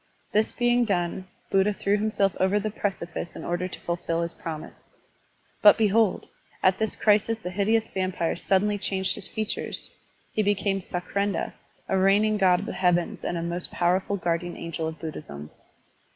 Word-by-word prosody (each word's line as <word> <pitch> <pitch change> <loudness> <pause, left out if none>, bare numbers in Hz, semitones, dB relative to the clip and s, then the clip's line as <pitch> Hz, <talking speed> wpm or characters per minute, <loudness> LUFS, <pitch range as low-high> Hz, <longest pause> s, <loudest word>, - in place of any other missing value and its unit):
This 215 +1 +2
being 240 0 +2
done, 185 -3 -1 0.2
Buddha 195 +2 +3
threw 200 +1 +1
himself 205 -2 +1
over 190 +2 +3
the 215 +1 -2
precipice 175 -5 -4
in - - -7
order 175 +1 -1
to 185 - -7
fulfill 170 -1 -1
his 170 - -2
promise. 160 -2 -8 0.7
But 205 - +8
behold! 215 -2 +2 0.4
at 185 0 +4
this 220 0 0
crisis 215 +1 +3
the 180 -5 -6
hideous 220 +4 +2
vampire 185 -3 -1
sud 190 +2 +2
denly 205 -1 -1
changed 190 -1 0
his 205 - -6
features, 215 -1 -3 0.4
he 215 - +2
became 200 -1 +1
Sakrendra, 185 +2 -2 0.3
a 190 - +1
reigning 205 +3 +4
god 180 -2 +4
of - - -5
the - - -4
heavens 175 -2 +1
and 175 - -2
a 165 - -2
most 170 +1 -3
pow 175 +1 +2
erful 200 +1 -3
guardian 175 0 -1
angel 165 -1 -4
of 160 0 -5
Buddhism. 75 - -7
190 Hz, 170 wpm, -26 LUFS, 175-210 Hz, 0.7 s, But